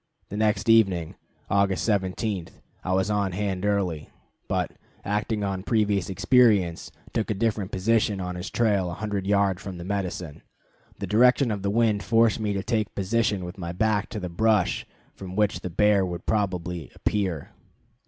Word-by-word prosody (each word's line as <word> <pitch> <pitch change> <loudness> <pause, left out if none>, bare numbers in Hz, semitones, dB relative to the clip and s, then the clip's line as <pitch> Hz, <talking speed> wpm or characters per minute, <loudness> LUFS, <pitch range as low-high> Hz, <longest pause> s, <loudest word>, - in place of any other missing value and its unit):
The 100 - -5
next 105 -1 +1
evening, 95 -8 +4 0.3
August 100 -1 +1
17, 100 -2 -1 0.4
I 90 - -2
was 95 +2 +1
on 100 -3 0
hand 100 0 -2
early; 90 -7 -1 0.4
but, - - -1 0.3
acting 105 +1 -1
on 95 -1 -2
previous 105 -3 +1
experience, 100 -4 +3 0.2
took 110 - -1
a 110 - 0
different 105 -2 -1
position 105 +1 +1
on 90 -1 -3
his 90 +2 -5
trail 100 -6 +1
a 85 - -5
hundred 100 -2 -3
yards 100 -2 +2
from 95 -3 -7
the 85 - -7
medicine. 90 -5 -4 0.6
The - - -4
direction 125 +3 +4
of 100 -2 -3
the 100 - -1
wind 110 -1 +2
forced 115 +2 +3
me 105 -2 -1
to 95 -1 -2
take 110 -2 -1
position 100 -1 0
with 90 +2 -8
my 85 -1 -4
back 105 +1 +1
to 105 - -5
the 90 - -4
brush 105 +2 +1 0.3
from 95 -1 -8
which 105 -1 +1
the 90 - -5
bear 105 +2 +3
would 90 -1 -5
probably 90 - -1
appear. 95 -8 -2
100 Hz, 170 wpm, -25 LUFS, 90-105 Hz, 0.6 s, evening